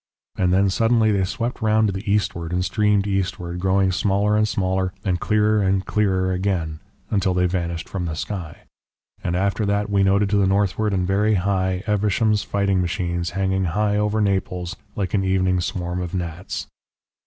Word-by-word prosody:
And 90 Hz, -1 st, +1 dB
then 95 Hz, +2 st, +3 dB
suddenly 115 Hz, +2 st, +3 dB
they 100 Hz, -2 st, +1 dB
swept 120 Hz, +6 st, -3 dB
round 110 Hz, 0 st, +3 dB
to -, -, 0 dB
the 100 Hz, +2 st, -3 dB
eastward 85 Hz, -5 st, -1 dB
and 90 Hz, 0 st, 0 dB
streamed 105 Hz, -1 st, +2 dB
eastward, 95 Hz, -3 st, -2 dB
growing 95 Hz, +1 st, +2 dB
smaller 100 Hz, +3 st, +1 dB
and 105 Hz, 0 st, +3 dB
smaller 95 Hz, -2 st, -1 dB
and 90 Hz, -2 st, 0 dB
clearer 105 Hz, +1 st, +2 dB
and 95 Hz, -1 st, +1 dB
clearer 95 Hz, -3 st, +1 dB
again 90 Hz, -5 st, -2 dB, 0.3 s
until 95 Hz, -3 st, +1 dB
they 90 Hz, 0 st, +2 dB
vanished 85 Hz, -2 st, -2 dB
from 90 Hz, -3 st, -4 dB
the 80 Hz, -2 st, -3 dB
sky. 85 Hz, -2 st, -5 dB, 0.6 s
And 85 Hz, -, -1 dB
after 100 Hz, +3 st, 0 dB
that 100 Hz, +1 st, 0 dB
we 100 Hz, -1 st, +3 dB
noted 100 Hz, +1 st, +2 dB
to 105 Hz, -, +3 dB
the 100 Hz, -1 st, +3 dB
northward 100 Hz, +2 st, +1 dB
and 95 Hz, -2 st, 0 dB
very 105 Hz, +3 st, +2 dB
high 95 Hz, -1 st, 0 dB
Evesham's 105 Hz, 0 st, +1 dB
fighting 100 Hz, -1 st, 0 dB
machines 85 Hz, -1 st, -2 dB
hanging 95 Hz, -1 st, +1 dB
high 105 Hz, +4 st, 0 dB
over 105 Hz, +1 st, +1 dB
Naples 95 Hz, -3 st, -1 dB, 0.2 s
like 95 Hz, -3 st, -3 dB
an 100 Hz, -2 st, +2 dB
evening 95 Hz, -1 st, +1 dB
swarm 90 Hz, 0 st, -3 dB
of 90 Hz, 0 st, -4 dB
gnats. 85 Hz, 0 st, -4 dB
95 Hz, 175 wpm, -22 LUFS, 90-105 Hz, 0.6 s, then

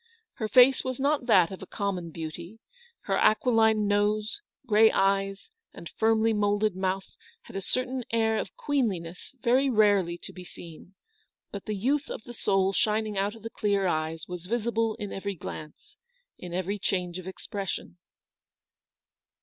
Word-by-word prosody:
Her 220 Hz, -, -2 dB
face 255 Hz, +3 st, +6 dB
was 255 Hz, 0 st, -3 dB
not 280 Hz, -2 st, +1 dB
that 185 Hz, -7 st, +5 dB
of 190 Hz, -, -8 dB
a 190 Hz, -, -8 dB
common 190 Hz, -4 st, -3 dB
beauty: 170 Hz, +5 st, -7 dB, 0.4 s
her -, -, -1 dB
aquiline 220 Hz, -2 st, +3 dB
nose, 210 Hz, -, 0 dB, 0.2 s
grey 220 Hz, -2 st, +6 dB
eyes, 195 Hz, -, 0 dB, 0.2 s
and 170 Hz, -, -9 dB
firmly 225 Hz, 0 st, +2 dB
moulded 205 Hz, -1 st, +1 dB
mouth 190 Hz, 0 st, -2 dB, 0.3 s
had -, -, -13 dB
a 195 Hz, -, -2 dB
certain 255 Hz, +4 st, -2 dB
air 220 Hz, -1 st, +2 dB
of -, -, -6 dB
queenliness 225 Hz, -, -2 dB
very 260 Hz, +3 st, +3 dB
rarely 205 Hz, -7 st, +3 dB
to -, -, -9 dB
be 180 Hz, -, -9 dB
seen; 175 Hz, +1 st, -12 dB, 0.6 s
but 200 Hz, -, -7 dB
the 215 Hz, -, -2 dB
youth 270 Hz, +8 st, 0 dB
of -, -, -6 dB
the 240 Hz, -, -10 dB
soul 195 Hz, -3 st, +1 dB
shining 215 Hz, +1 st, +1 dB
out 200 Hz, +2 st, -1 dB
of 225 Hz, -, -14 dB
the 225 Hz, -, -6 dB
clear 200 Hz, -2 st, 0 dB
eyes 160 Hz, -1 st, -1 dB
was 180 Hz, -1 st, -7 dB
visible 225 Hz, 0 st, 0 dB
in 205 Hz, -1 st, -6 dB
every 200 Hz, 0 st, -4 dB
glance, 155 Hz, -2 st, -9 dB, 0.4 s
in 180 Hz, -, -9 dB
every 185 Hz, +3 st, -2 dB
change 180 Hz, -2 st, -2 dB
of 185 Hz, -, -9 dB
expression. 190 Hz, -2 st, -5 dB
205 Hz, 160 wpm, -28 LUFS, 185-225 Hz, 0.6 s, face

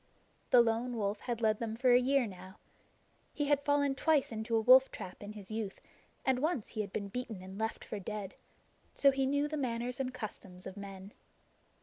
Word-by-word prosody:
The 245 Hz, -, +8 dB
Lone 235 Hz, +1 st, 0 dB
Wolf 205 Hz, -1 st, -1 dB
had 235 Hz, 0 st, -4 dB
led 215 Hz, -1 st, +2 dB
them 225 Hz, -1 st, -3 dB
for 250 Hz, +1 st, +4 dB
a 245 Hz, -, +7 dB
year 270 Hz, 0 st, +3 dB
now. 190 Hz, -1 st, -10 dB, 0.8 s
He 290 Hz, -, 0 dB
had 285 Hz, -1 st, +2 dB
fallen 285 Hz, -1 st, +2 dB
twice 295 Hz, -1 st, +2 dB
into 225 Hz, +1 st, -2 dB
a -, -, +4 dB
wolf 255 Hz, +3 st, +7 dB
trap 185 Hz, -, -8 dB
in 205 Hz, +1 st, -7 dB
his 205 Hz, -1 st, -9 dB
youth, 215 Hz, -3 st, -4 dB, 0.5 s
and 260 Hz, -1 st, +2 dB
once 300 Hz, -5 st, -1 dB
he 215 Hz, -, -3 dB
had 200 Hz, -2 st, -5 dB
been 200 Hz, 0 st, -3 dB
beaten 225 Hz, -4 st, -5 dB
and 190 Hz, +2 st, -9 dB
left 220 Hz, 0 st, -2 dB
for 210 Hz, -, -5 dB
dead; 205 Hz, 0 st, -5 dB, 0.6 s
so 275 Hz, -, +6 dB
he 270 Hz, 0 st, 0 dB
knew 285 Hz, +2 st, +1 dB
the 305 Hz, +1 st, -3 dB
manners 245 Hz, -2 st, -2 dB
and 260 Hz, -1 st, -1 dB
customs 195 Hz, -6 st, -8 dB
of 190 Hz, -, -7 dB
men. 195 Hz, 0 st, -9 dB
230 Hz, 205 wpm, -33 LUFS, 205-265 Hz, 0.8 s, The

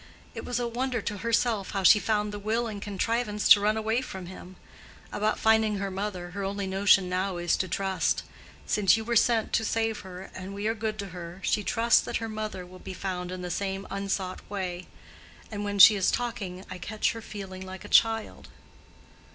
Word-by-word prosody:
It -, -, -6 dB
was 245 Hz, 0 st, -2 dB
a 240 Hz, -, -1 dB
wonder 245 Hz, +1 st, -2 dB
to 205 Hz, 0 st, -4 dB
herself 230 Hz, -2 st, 0 dB
how 195 Hz, -1 st, -1 dB
she 210 Hz, -, +8 dB
found 210 Hz, -1 st, 0 dB
the 205 Hz, -, -5 dB
will 220 Hz, +3 st, 0 dB
and 210 Hz, -3 st, -5 dB
contrivance 210 Hz, +1 st, -1 dB
to 205 Hz, -, +10 dB
run 210 Hz, +2 st, +1 dB
away 220 Hz, +3 st, 0 dB
from 190 Hz, -7 st, -7 dB
him. 185 Hz, +1 st, -10 dB, 0.6 s
About 215 Hz, +1 st, 0 dB
finding 220 Hz, -1 st, +3 dB
her 195 Hz, 0 st, -3 dB
mother, 190 Hz, -2 st, -4 dB
her 200 Hz, +2 st, -4 dB
only 200 Hz, +1 st, -2 dB
notion 190 Hz, 0 st, +4 dB
now 185 Hz, 0 st, -1 dB
is 175 Hz, -1 st, +1 dB
to 185 Hz, -, -1 dB
trust; 190 Hz, +1 st, 0 dB, 0.4 s
since 210 Hz, +1 st, +3 dB
you 225 Hz, -, -4 dB
were 235 Hz, +1 st, -1 dB
sent 230 Hz, 0 st, +3 dB
to 225 Hz, -, +2 dB
save 225 Hz, 0 st, 0 dB
her 185 Hz, 0 st, -10 dB
and 190 Hz, +2 st, -7 dB
we 205 Hz, +1 st, -4 dB
are 225 Hz, -, +2 dB
good 220 Hz, -1 st, -3 dB
to 200 Hz, -2 st, -5 dB
her, 175 Hz, 0 st, -8 dB
she 210 Hz, -, +1 dB
trusts 230 Hz, +3 st, +3 dB
that -, -, -3 dB
her 225 Hz, -, -4 dB
mother 215 Hz, -4 st, -5 dB
will 185 Hz, +1 st, -13 dB
be 185 Hz, -, -8 dB
found 180 Hz, -2 st, -4 dB
in 185 Hz, 0 st, -6 dB
the 180 Hz, -, -4 dB
same 195 Hz, +1 st, -3 dB
unsought 195 Hz, -1 st, -2 dB
way. 185 Hz, -3 st, -4 dB, 0.6 s
And 205 Hz, -1 st, -4 dB
when 205 Hz, 0 st, -2 dB
she 205 Hz, +2 st, +10 dB
is 195 Hz, -1 st, +2 dB
talking 200 Hz, -6 st, -3 dB
I 185 Hz, -, -8 dB
catch 215 Hz, +3 st, -1 dB
her 230 Hz, -, -7 dB
feeling 190 Hz, -3 st, -8 dB
like 190 Hz, +2 st, -9 dB
a -, -, -7 dB
child." 225 Hz, +1 st, +2 dB
200 Hz, 210 wpm, -27 LUFS, 190-220 Hz, 0.6 s, to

